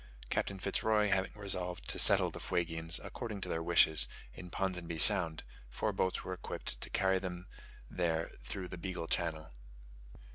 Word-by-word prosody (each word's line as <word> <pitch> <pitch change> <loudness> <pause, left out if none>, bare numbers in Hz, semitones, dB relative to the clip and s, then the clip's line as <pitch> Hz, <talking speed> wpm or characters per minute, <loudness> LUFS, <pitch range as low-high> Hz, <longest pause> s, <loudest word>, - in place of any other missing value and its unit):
Captain 100 - -1
Fitz 100 +1 -2
Roy 105 -1 +2
having 95 -1 +1
resolved 95 -4 -3
to - - -1
settle - - +6
the - - -8
Fuegians, 80 0 -2
according 110 -5 -6
to - - -3
their 80 - -1
wishes, 80 -2 +5 0.3
in 90 +6 -10
Ponsonby 90 -3 -3
Sound, 85 -1 +5 0.3
four 85 - -2
boats 95 -1 -1
were 95 - -4
equipped 90 - -3
to - - -3
carry 95 0 +2
them 90 -1 -6 0.4
there 85 -2 -1
through 90 +8 -5
the 90 - -7
Beagle 90 -2 -4
Channel. 80 -2 -2
90 Hz, 160 wpm, -33 LUFS, 80-95 Hz, 0.4 s, settle